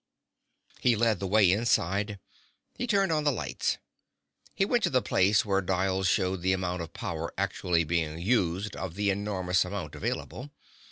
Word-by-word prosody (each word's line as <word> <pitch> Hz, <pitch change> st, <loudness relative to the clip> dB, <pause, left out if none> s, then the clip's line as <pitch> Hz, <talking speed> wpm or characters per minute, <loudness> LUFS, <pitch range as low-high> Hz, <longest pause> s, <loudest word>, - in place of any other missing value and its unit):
He 120 Hz, -2 st, +3 dB
led 110 Hz, -3 st, +2 dB
the 95 Hz, -, -3 dB
way 100 Hz, -2 st, +5 dB
inside. 105 Hz, -1 st, +1 dB, 0.6 s
He 245 Hz, -, -4 dB
turned 195 Hz, -5 st, +2 dB
on 155 Hz, -1 st, +1 dB
lights. 140 Hz, -6 st, -1 dB, 0.8 s
He 195 Hz, -, +2 dB
went 240 Hz, +3 st, +1 dB
to -, -, +1 dB
the 130 Hz, -, +3 dB
place 95 Hz, +3 st, +3 dB
where 100 Hz, -1 st, +1 dB
dials 95 Hz, +1 st, 0 dB
showed 95 Hz, 0 st, +1 dB
the 95 Hz, +1 st, +2 dB
amount 90 Hz, -1 st, -2 dB
of 80 Hz, -, -7 dB
power -, -, -4 dB
actually 85 Hz, -2 st, 0 dB
being 80 Hz, -1 st, -1 dB
used 95 Hz, 0 st, 0 dB
of 95 Hz, -3 st, -5 dB
the 100 Hz, 0 st, +1 dB
enormous 95 Hz, -3 st, 0 dB
amount 90 Hz, -5 st, -5 dB
available. 120 Hz, -, -4 dB
95 Hz, 160 wpm, -28 LUFS, 90-110 Hz, 0.8 s, way